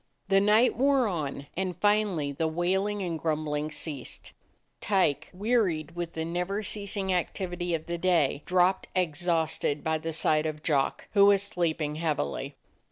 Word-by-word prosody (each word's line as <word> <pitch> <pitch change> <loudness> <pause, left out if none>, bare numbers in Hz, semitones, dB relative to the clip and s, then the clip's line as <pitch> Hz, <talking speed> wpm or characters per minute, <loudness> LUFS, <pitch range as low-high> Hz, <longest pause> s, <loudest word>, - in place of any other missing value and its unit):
The 195 0 +5
night 215 +5 +4
wore 270 0 +3
on, 145 -7 -3
and 185 -2 -2
finally 205 -7 +1
the 160 +3 -1
wailing 190 +5 0
and 170 -3 -3
grumbling 155 -1 -1
ceased. 150 -4 -5 0.5
Tyke, 190 -8 +1
wearied 185 -6 0
with 175 -1 -4
the 160 0 -3
never 180 +5 -2
ceasing 200 -2 -1
activity 175 -1 -2
of 160 - -5
the 170 0 -4
day, 165 -6 +2
dropped 185 +1 +2
exhausted 160 -3 0
by 160 0 0
the 165 +1 -4
side 155 -1 +2
of 155 0 -5
Jock, 140 -4 0
who 200 -1 +6
was 200 -1 +5
sleep 170 -5 -1
ing 150 0 -3
heavily. 155 - -2
175 Hz, 155 wpm, -28 LUFS, 155-195 Hz, 0.5 s, who